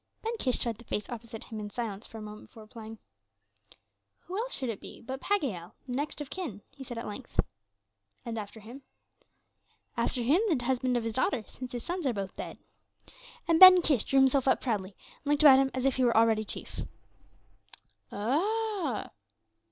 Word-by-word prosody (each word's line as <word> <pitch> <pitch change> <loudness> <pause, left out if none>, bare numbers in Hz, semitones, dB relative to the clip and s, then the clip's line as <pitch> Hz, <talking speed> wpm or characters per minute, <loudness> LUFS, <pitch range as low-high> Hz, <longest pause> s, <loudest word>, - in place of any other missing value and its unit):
Ben 455 +1 -1
Kish 255 -2 +1
studied 230 -2 -2
the - - -12
face 210 - -2
opposite 230 -2 -7
him 220 - -7
in 210 -1 -5
silence 215 -2 -5
for 225 - -10
a 215 - -7
moment 210 0 -9
before 220 - -13
replying. 220 0 -10 1.2
"Who 370 - -8
else 470 +5 -2
should 260 -3 -2
it 220 - -4
be - - -9
but 260 +3 -6
Pagiel, 255 - -1
the 255 - -7
next 290 +4 -2
of 285 - -7
kin?" 280 - -5
he 270 0 -10
said 240 -2 -7
at 230 - -4
length. 235 +5 -8 0.9
"And 230 -1 -3
after 215 +1 -8
him?" 240 +6 -10 1.1
"After 245 - 0
him, 295 - +4
the 260 -8 +1
husband 255 -1 +1
of 235 - -1
his 225 -1 -2
daughter, 250 -2 0
since 255 -1 -8
his 240 -2 -4
sons 350 -4 -2
are 250 - +1
both 195 -2 -4
dead." - - -6 0.9
And 330 -1 +4
Ben 370 -1 +11
Kish 275 -9 +3
drew 275 - +1
himself 265 0 +3
up - - +4
proudly 200 -6 -2 0.2
and - - -14
looked 295 +1 +3
about 270 -3 +9
him 270 0 +3
as 260 0 -1
if 270 -1 +2
he 260 - +2
were 235 -2 +3
already 220 -1 +4
chief. - - -6 1.3
"Ah!" 340 - -1
245 Hz, 190 wpm, -30 LUFS, 220-280 Hz, 1.3 s, Ben